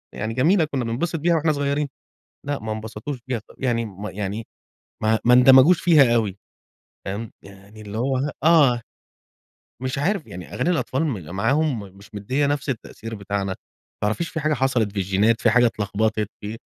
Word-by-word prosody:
يعني 110 +2 -3
جميلة 160 - +3
كنا 140 -5 -3
بننبسط 130 +10 -2
بيها 170 +2 +2
وإحنا 155 0 +2
صغيرين، 145 0 0 0.6
لا 145 -1 -1
ما 110 0 -5
انبسطوش 110 +5 -5
بيها 125 -3 -1
ط 105 - -22
يعني 120 -3 0
ما 105 +1 -7
يعني 105 +2 -4 0.6
ما 110 +1 +3
ما 120 +1 +6
اندمجوش 130 +7 +7
فيها 150 -8 +5
أوي 105 -5 0 0.7
فاهم، 100 +3 -5
يعني 100 +2 -14
اللي 105 +1 -7
هو 130 +2 0
ه 145 +3 -1
آه، 145 -8 +5 1.0
مش 130 +1 -2
عارف 180 +3 0
يعني 90 +1 -9
أغاني 150 +8 0
الأطفال 160 -3 0
م 95 - -5
معاهم 135 +6 +1 0.2
مش 100 - -17
مديه 130 +8 0
نفس 145 0 -2
التأثير 115 -2 -6
بتاعنا، 100 -2 -3 0.5
متعرفيش 110 +11 0
في 160 - -4
حاجة 155 0 +1
حصلت 125 -6 +1
في 100 - -5
الجينات 100 +4 +2
في 115 - +4
حاجة 120 +1 +5
اتلخبطت 110 0 -1
في 110 +2 -6
120 Hz, 170 wpm, -23 LUFS, 105-145 Hz, 1.0 s, اندمجوش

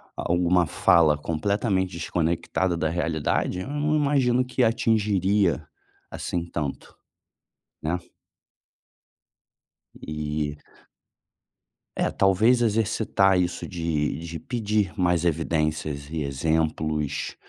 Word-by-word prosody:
ah, - - -3
uma 90 -1 +3
fala 75 -1 +4
completamente 95 +4 -1
desconectada 85 +2 -1
da 80 -1 0
realidade, 85 +1 -1
eu - - -6
não 150 +1 0
imagino 135 -4 +2
que 125 0 0
atingiria 105 -5 +2 0.4
assim 85 -1 -3
tanto, 75 -5 -5 0.9
né? 85 +3 -1 2.0
E 75 -1 -4 1.4
É, - - +1
talvez 110 +6 +3
exercitar 110 -3 +2
isso 90 -1 -2
de 80 -5 -2
de 85 0 -6
pedir 105 -2 -1
mais 90 -3 +1
evidências 75 -3 -1
e 80 - -2
exemplos, 75 +1 -1
85 Hz, 95 wpm, -25 LUFS, 80-105 Hz, 2.0 s, fala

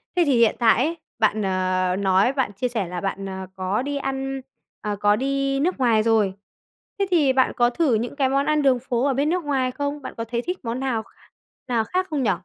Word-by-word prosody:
Thế 355 - +4
thì 275 -4 +3
hiện 230 -2 +4
tại 235 +2 +4
ấy 335 +2 -2 0.2
bạn, 215 -1 +2
ờ, 185 -1 0
nói 195 +5 +3
bạn 265 -7 -1
chia 225 +6 -1
sẻ 225 -6 -2
là 180 0 -5
bạn, 195 0 -3
ờ, 190 -1 -6
có 190 +4 -1
đi 285 +2 -3
ăn, 270 0 -3 0.4
à, 210 -1 -2
có 205 0 +4
đi 275 +2 0
nước 345 +6 0
ngoài 230 -4 +3
rồi, 220 -4 +2 0.7
thế 395 - +2
thì 295 -7 +4
bạn 260 0 +2
có 240 0 +3
thử 270 +1 +1
những 235 +5 -2
cái 270 -2 +1
món 275 +1 +1
ăn 305 0 +2
đường 265 -3 +3
phố 245 0 -1
ở 280 - +2
bên 280 +3 +1
nước 355 +1 0
ngoài 265 -3 0
không? 285 +2 -3
Bạn 265 - -7
có 230 - -2
thấy 235 +1 -2
thích 360 +8 -4
món 230 +2 -2
nào 255 -5 -1
kh - - -24 0.6
nào 235 -3 +1
khác 370 - -1
không 295 -4 -1
nhỉ? 210 - +3
250 Hz, 240 wpm, -23 LUFS, 215-275 Hz, 0.7 s, Thế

